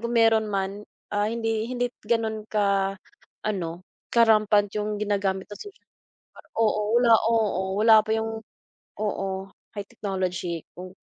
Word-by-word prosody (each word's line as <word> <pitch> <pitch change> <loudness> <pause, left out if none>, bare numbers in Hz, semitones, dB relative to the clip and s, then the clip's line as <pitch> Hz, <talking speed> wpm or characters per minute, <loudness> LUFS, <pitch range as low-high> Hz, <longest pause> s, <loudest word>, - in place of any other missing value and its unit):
kung 235 +1 -2
mayro'n 225 -1 +4
man, 195 0 -2 0.3
ah, 205 0 +1
hindi 225 -1 -1
hindi 245 -1 -2 0.2
gano'n 220 -2 -1
ka-ano, 195 -3 -2 0.2
ka-rampant 215 -3 +4
yung 210 0 -2
ginagamit 200 -2 -1
ng 205 - -9
social 410 0 -11
media. - - -66 0.6
Oo 220 -2 +2 0.2
wala, 240 -1 +5 0.2
oo 220 -4 +1 0.2
wala 225 -1 +8
pa 220 +1 -1
yung 225 0 -3 0.6
oo, 195 -2 -3 0.2
high 205 -1 -5
technology 185 -4 -3
kung, 185 +1 -9
210 Hz, 130 wpm, -25 LUFS, 195-225 Hz, 0.6 s, wala